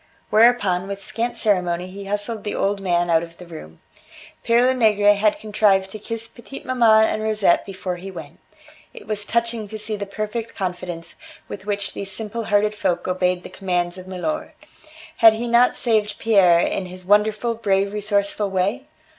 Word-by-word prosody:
Whereupon, 210 -5 +3
with 200 0 -6
scant 230 +5 -3
ceremony, 180 -4 0
he 195 +2 -9
hustled 205 +2 -3
the 210 - -3
old 200 0 0
man 175 -2 +1
out 165 -1 +4
of 170 0 -10
the 180 - -11
room. 80 - -11 0.6
Pere 230 +1 +3
Lenegre 215 -5 +4
had 205 +1 +1
contrived 205 -3 +1
to 215 - -8
kiss 230 +1 -4
petite 235 +4 -12
maman 225 -4 +4
and 215 - -2
Rosette 215 -4 +2
before 190 -2 -5
he 190 +2 -8
went. 180 -3 -10 0.6
It 470 - -11
was 210 -1 -2
touching 235 -1 -1
to 215 +2 -7
see 215 0 -2
the 200 -1 -5
perfect 215 +3 -5
confidence 180 -3 -5 0.3
with 200 0 -9
which 200 -1 -2
these 195 - -5
simple 220 +2 -4
hearted 210 0 +2
folk 190 -4 -1
obeyed 180 -1 0
the - - -9
commands 175 -2 -2
of 185 - -11
milor. 190 +12 -4 0.6
Had 225 -1 +8
he 235 +2 -4
not 235 +1 +4
saved 215 -3 0
Pierre 190 -6 +4
in 185 +1 -2
his 185 0 -9
wonderful, 210 +3 +2
brave, 200 -3 0
resourceful 205 0 -1
way? 200 +9 -1
205 Hz, 175 wpm, -21 LUFS, 185-220 Hz, 0.6 s, Had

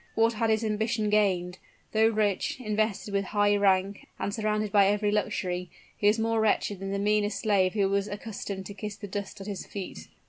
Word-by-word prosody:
What 225 +1 +3
had 225 +1 0
his 220 0 +2
ambition 215 0 0
gained? 185 -4 +1 0.3
Though 220 0 +4
rich, 215 0 0
invested 215 -3 -1
with 200 0 +1
high 205 +1 +2
rank, 195 0 +1
and 200 - -3
surrounded 215 -1 -1
by 200 -2 +5
every 205 +1 +1
luxury, 180 -3 -1 0.3
he 205 - +1
was 210 +2 +4
more 225 0 +1
wretched 205 -2 +1
than 195 0 -4
the 200 - -1
meanest 210 +1 +1
slave 195 -4 +2
who 200 -3 +2
was 200 +1 0
accustomed 205 -2 -6
to 200 - -7
kiss 205 +1 -6
the 205 0 -8
dust 200 0 -5
at - - -7
his 200 -2 -5
feet. 180 - -7
205 Hz, 200 wpm, -28 LUFS, 195-215 Hz, 0.3 s, by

